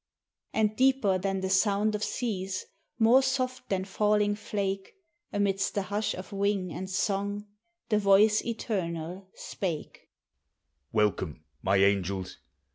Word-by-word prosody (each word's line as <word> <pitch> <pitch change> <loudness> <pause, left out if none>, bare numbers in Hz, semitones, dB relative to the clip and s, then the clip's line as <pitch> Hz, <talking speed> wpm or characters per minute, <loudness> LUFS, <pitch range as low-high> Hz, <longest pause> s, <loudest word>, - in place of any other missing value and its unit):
And 215 -1 +1
deeper 255 -7 +3
than 195 0 -1
the 190 - -1
sound 205 +2 +3
of 210 0 -2
seas, 190 -7 -2 0.3
more 235 +3 +6
soft 255 -1 -1
than 190 -1 0
falling 210 +1 +2
flake, 195 -2 -3 0.4
Amidst 195 -1 0
the 200 - +1
hush 205 +2 -1
of 185 +3 -8
wing 195 -3 0
and 190 +4 -5
song 200 +2 -1 0.4
the 210 -2 +3
Voice 210 +2 +5
Eternal 185 -5 -3
spake: 170 -6 -5 0.8
"Welcome, 100 -8 0 0.2
my 95 +1 +2
angels! 95 -1 +1
195 Hz, 120 wpm, -29 LUFS, 185-210 Hz, 0.8 s, more